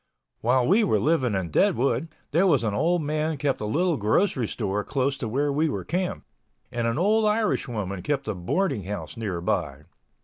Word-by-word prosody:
While 125 +1 +2
we 210 +6 +4
were 150 - +2
living 130 -3 +1
in 90 -4 -2
Deadwood, 140 - +2 0.2
there 170 +6 +3
was 145 - +3
an 110 -3 0
old 165 +8 +1
man 155 +1 -1
kept 140 -3 -1
a - - -2
little 165 +9 +1
grocery 115 - +1
store 105 -2 -2
close 135 0 0
to 120 - -3
where 140 +5 0
we 155 +3 +1
were - - -4
camped, 180 +3 -2 0.5
and 120 -1 -1
an 115 +2 -1
old 215 +5 +3
Irish 215 -7 +1
woman 100 -5 -4
kept 140 +5 -2
a 110 - 0
boarding 105 - -1
house 105 +2 -5
nearby. 95 -7 -2
135 Hz, 190 wpm, -25 LUFS, 110-165 Hz, 0.5 s, we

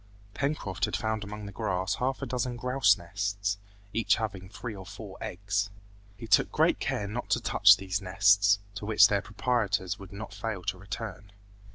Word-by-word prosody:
Pencroft 140 - -1
had - - -3
found 110 -1 -2
among 105 0 -7
the 100 - -7
grass 95 -1 -1
half 130 +2 -1
a - - 0
dozen 125 0 -2
grouse 125 -5 +3
nests, 100 +3 -2 0.3
each 115 +1 +3
having 95 -4 -4
three 110 +2 -6
or 95 - -8
four 100 0 -9
eggs. 100 +2 -2 0.5
He - - -8
took 110 -1 +4
great - - +3
care 100 - -2
not 115 +4 -5
to - - +3
touch - - +6
these 95 +1 -3
nests, 100 +2 +4 0.2
to 105 0 -6
which 105 -2 +7
their 100 -1 +2
proprietors 105 -4 -1
would 95 -2 -11
not 100 +1 -7
fail 105 -2 -4
to 95 - -2
return. 100 0 -7
100 Hz, 180 wpm, -29 LUFS, 95-110 Hz, 0.5 s, which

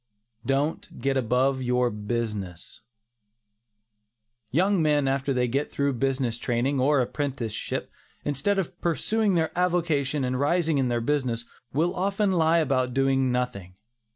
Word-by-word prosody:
DON'T 140 +4 -1
GET 135 0 0
ABOVE 130 +2 +1
YOUR 125 -1 +1
BUSINESS. 105 -3 -4 1.7
Young 185 - +2
men 150 -3 +2
after 135 +1 0
they 125 -2 +1
get 140 +5 -1
through 140 0 0
their 125 - -6
business 130 -3 0
training, 125 +3 0
or 140 +1 +3
apprenticeship, 125 -4 -3 0.3
instead 145 +8 0
of 185 -2 -3
pursuing 200 +4 +1
their 160 -2 0
avocation 165 -6 +1
and 130 0 -1
rising 160 +1 +2
in 130 - +2
their 120 -1 0
business, 120 -3 -1 0.3
will 165 +6 +1
often 195 +2 +1
lie 165 -2 +3
about 130 -5 +1
doing 135 -1 +2
nothing. 125 -8 -3
135 Hz, 135 wpm, -26 LUFS, 125-160 Hz, 1.7 s, or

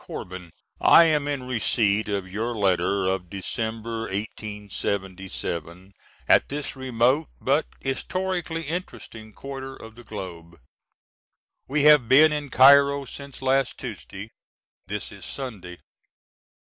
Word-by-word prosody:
CORBIN: 90 -1 -7 0.3
I 170 - +8
am 150 -3 +2
in 140 -3 -2
receipt 110 -4 +1
of 100 -2 -2
your 110 +5 -3
letter 100 -1 +1
of 95 -2 -1
December 110 +3 -4 0.2
'77 95 -3 -5 0.3
at - - +4
this 145 0 -4
remote, 130 +3 +1
but 140 +4 +1
historically 175 +4 -2
interesting 140 -9 -7
quarter 135 +2 -8
of 110 -3 -12
the 120 +2 -14
globe. 85 -6 -9 1.1
We 145 +2 +1
have 150 -6 +6
been 150 +4 +7
in 145 -2 -3
Cairo 140 +2 +6
since 140 0 -9
last 135 -1 +1
Tuesday. 105 -3 -8 0.6
This 105 +1 -5
is 100 - -12
Sunday. 100 -10 -7
115 Hz, 115 wpm, -25 LUFS, 100-140 Hz, 1.1 s, I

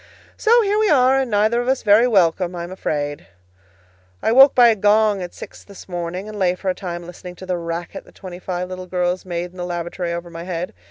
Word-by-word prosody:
So 470 +1 +4
here 415 +1 +1
we 435 -1 +2
are, 265 -2 +4
and 265 -2 -1
neither 215 +3 +2
of 245 - -5
us 265 0 0
very 215 +3 +5
welcome, 180 -4 +2
I 170 - -5
am 175 - -8
afraid. 145 - -4 1.0
I - - +2
woke 270 +3 +7
by 245 -2 +7
a 225 - +3
gong 210 0 +3
at 175 -1 -7
six - - -11
this 200 -2 -13
morning, 175 +2 -5
and 215 -1 -8
lay 180 -1 +2
for 190 +1 -4
a - - -3
time 175 -2 -6
listening 180 +1 -10
to 185 - -10
the 185 -1 -1
racket 170 0 -5
that - - -20
twenty 180 -2 -9
five 180 -1 -4
little 185 0 -7
girls 180 0 -2
made 175 0 -4
in 185 - -17
the 180 - -4
lavatory 175 0 -4
over 170 0 -5
my 165 0 -8
head. 175 0 -5
185 Hz, 235 wpm, -20 LUFS, 175-215 Hz, 1.0 s, woke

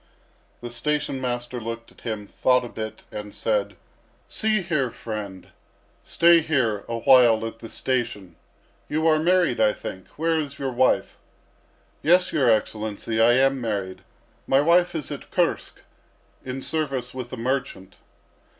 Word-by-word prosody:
The 120 0 -7
station 135 +2 -2
master 120 -1 -3
looked 115 +1 -6
at - - -21
him, 110 -3 -4
thought 125 +4 +2
a - - -7
bit, 110 -1 -7
and 105 -1 -7
said: 105 -3 -1 0.5
"See 215 -3 0
here, 155 -7 0
friend, 105 -5 -7 0.5
stay 170 0 +5
here 130 -10 0
a 115 - -2
while 115 -4 +6
at 115 0 -7
the 115 - -9
station. 105 -9 -2 0.5
You 155 +1 0
are 155 -1 +4
married, 175 -5 +2
I 105 -1 +4
think. 95 -1 -8
Where 165 +1 +1
is 145 -3 -5
your 135 -2 -3
wife?" 130 +1 +1 0.8
"Yes, 180 +3 +3
your 130 -5 +3
Excellency, 110 0 0
I 120 +1 +6
am 135 +1 +3
married. 100 -5 -3 0.5
My 135 - +4
wife 170 +4 +3
is 150 -2 -3
at 145 - -7
Kursk, - - -1 0.6
in 130 +1 -5
service 135 -6 -2
with 125 -2 -6
a 130 - -6
merchant." 125 -6 -3
125 Hz, 150 wpm, -24 LUFS, 110-150 Hz, 0.8 s, while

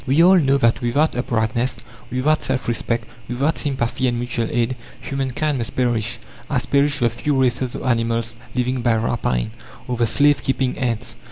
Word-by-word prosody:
We 140 +6 +5
all 185 +1 +7
know 140 -3 +3
that 115 -4 +2
without 130 +6 +1
uprightness, 115 0 0 0.3
without 145 +5 +2
self 130 -4 -2
respect, 115 0 -1 0.2
without 135 +6 0
sympathy 130 -2 0
and 120 -1 0
mutual 120 -1 -1
aid, 120 +2 0 0.2
human 135 -1 -3
kind 145 +2 -1
must 115 - -4
perish, 120 -3 0 0.3
as - - 0
perish 145 +1 +2
the 120 -4 +2
few 135 +4 -1
races 125 -1 +1
of - - -5
animals 115 -2 0 0.2
living 125 0 0
by 120 -1 +3
rapine, 110 - -1 0.4
or 125 - -2
the 120 -1 +2
slave 145 +2 +3
keeping 130 -1 0
ants. 120 -5 -3
125 Hz, 175 wpm, -21 LUFS, 115-135 Hz, 0.4 s, all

